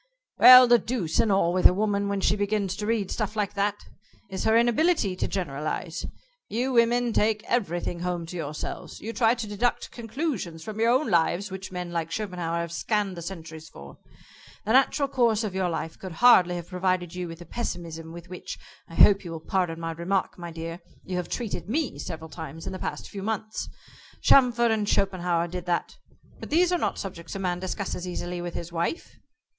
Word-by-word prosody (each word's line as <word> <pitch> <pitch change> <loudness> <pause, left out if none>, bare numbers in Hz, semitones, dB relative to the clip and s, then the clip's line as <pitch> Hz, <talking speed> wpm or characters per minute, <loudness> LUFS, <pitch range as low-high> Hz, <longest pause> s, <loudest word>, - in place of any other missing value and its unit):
"Well, 255 0 +11
the 240 0 +6
deuce 200 -12 -2
and 220 - +3
all 185 -3 +3
with 185 0 +7
a 180 - 0
woman 200 0 0
when 200 -1 -1
she 200 - +3
begins 205 -2 -1
to 210 - -3
read 220 -4 0
stuff 215 -1 -2
like 210 -2 -1
that 205 0 0 0.5
is 190 - -3
her 220 +1 +5
inability 235 - +2
to - - -1
generalize. 160 0 -3 0.4
You 250 +4 -1
women 240 0 +3
take 215 0 +2
everything 175 -7 -1
home 175 -1 -2
to 170 - -8
yourselves. 155 -3 -5
You 225 +2 -6
try 230 0 +3
to 230 -2 -4
deduct 210 +4 -1
conclusions 225 - -4
from 215 +3 -6
your 230 +1 +3
own 255 0 +2
lives 175 +3 +2
which 190 0 -7
men 180 -1 -5
like 165 -1 -2
Schopenhauer 175 -3 -2
have 170 -1 -5
scanned 200 +2 -1
the 170 - -7
centuries 160 -3 -8
for. 70 0 -12 0.7
The 220 - +1
natural 275 +2 +4
course 235 -4 +2
of 210 -4 -3
your 190 -1 0
life 165 -1 -4
could 185 -3 -7
hardly 180 -4 +6
have 175 -1 -6
provided 185 -2 -1
you 180 -1 -4
with 165 0 -8
the 175 - -11
pessimism 165 -5 -5
with 170 +1 -10
which 180 0 -7 0.3
I 165 - -11
hope 200 +2 +6
you 175 - -7
will 165 -1 -5
pardon 180 -4 0
my 165 0 -3
remark, 175 +4 -1
my 175 -1 -7
dear 165 +1 -6 0.2
you 185 - -4
have 180 - -3
treated 225 -4 -4
me 295 +3 -1
several 160 -1 -6
times 160 -1 -8
in - - -4
the 185 - -6
past - - -4
few 200 - -7
months. 215 +1 -3 0.5
Chamfort 240 -3 +5
and 215 -2 0
Schopenhauer 175 -3 +1
did 180 0 -6
that. 175 -1 -1 0.4
But - - -8
these 350 +3 +3
are 355 - +2
not - - -1
subjects 175 -3 -7
a - - -2
man 180 -2 -1
discusses 185 -1 -4
easily 175 0 -4
with 175 0 -5
his 170 0 -6
wife." 170 - -3
190 Hz, 200 wpm, -26 LUFS, 170-220 Hz, 0.7 s, Well